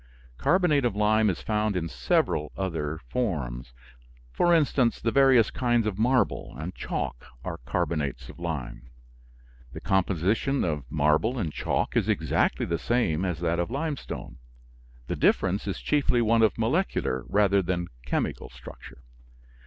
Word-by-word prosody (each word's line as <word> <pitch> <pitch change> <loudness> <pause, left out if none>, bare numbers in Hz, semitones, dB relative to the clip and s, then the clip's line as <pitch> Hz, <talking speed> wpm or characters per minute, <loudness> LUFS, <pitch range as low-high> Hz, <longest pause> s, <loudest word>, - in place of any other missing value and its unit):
Carbonate 160 - +3
of 120 -5 0
lime 105 +1 +3
is 90 - -3
found 105 -1 0
in 85 -2 -2
several 70 +2 0
other 80 -5 -2
forms; 65 - -3 0.6
for 175 - +3
instance, 140 -7 +3
the 115 - 0
various 130 -5 +5
kinds 120 -2 +1
of 105 -2 -2
marble 120 - +1
and 80 +6 -5
chalk - - -4 0.2
are - - -5
carbonates 70 -1 -2
of - - -12
lime. 65 -8 -5 0.8
The - - -6
composition 95 - +1
of 75 -7 -3
marble 75 - +2
and 85 -10 -2
chalk - - -1
is - - +1
exactly - - +1
the 85 -1 -2
same 95 -9 0
as 90 -3 -2
that 85 0 0
of 85 - -1
limestone. 140 - -5 0.7
The - - -3
difference 95 +3 +1
is 100 - -3
chiefly 145 -4 +1
one 115 +1 +3
of 110 - +3
molecular 115 - 0
rather 100 -1 +3
than 90 -1 -2 0.2
chemical 65 - -2
structure. 65 +1 -13
95 Hz, 145 wpm, -27 LUFS, 75-120 Hz, 0.8 s, various